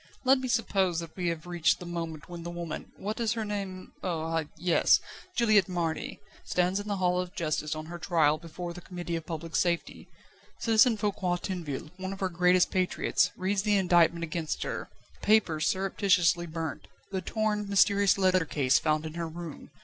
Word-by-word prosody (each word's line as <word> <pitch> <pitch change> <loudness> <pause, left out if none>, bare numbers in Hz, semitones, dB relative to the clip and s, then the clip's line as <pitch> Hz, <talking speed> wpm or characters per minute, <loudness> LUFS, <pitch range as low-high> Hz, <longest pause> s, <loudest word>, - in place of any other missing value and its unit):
Let 265 0 +5
me 260 - -3
suppose 195 -7 +1
that 165 -1 -8
we 180 -2 -2
have 165 0 -2
reached 175 -2 +1
the 180 - -8
moment 165 -2 -5
when 175 -1 -8
the 170 - -6
woman 170 -2 -6
what 210 +4 -4
is 230 -1 +1
her 225 -2 -3
name? 195 -3 -5
Oh! 170 -3 -2
ah! 165 0 0
yes! 175 +1 +4 0.4
Juliette 215 -6 +4
Marny 170 -3 -2 0.2
stands 180 +2 +1
in 205 - -6
the 205 - -1
Hall 180 -1 +1
of 180 +2 -8
Justice 155 -2 -1
on 155 0 -6
her 170 +2 -7
trial 155 -3 +2
before 170 +1 -7
the 175 - -9
Committee 175 -1 -5
of 165 -1 -5
Public 165 0 -5
Safety. 170 -1 0 0.5
Citizen 225 0 +4
Foucquier 200 -4 0
Tinville, 165 -5 -5
one 190 +1 -4
of 195 - -10
our 190 - +1
greatest 180 +1 +3
patriots, 185 -1 +1
reads 190 +1 0
the 205 0 +2
indictment 170 -2 +3
against 160 -1 -3
her: - - -4 0.2
the - - -25
papers 195 -8 +3
surreptitiously 185 -3 +2
burnt, 160 -1 -5 0.2
the 190 -1 -2
torn, 210 -1 -1
mysterious 200 0 +4
letter 185 -2 +3
case 140 -4 +2
found 155 0 0
in 155 - -6
her 170 0 -3
room. 165 -1 -8
175 Hz, 190 wpm, -29 LUFS, 165-195 Hz, 0.5 s, Let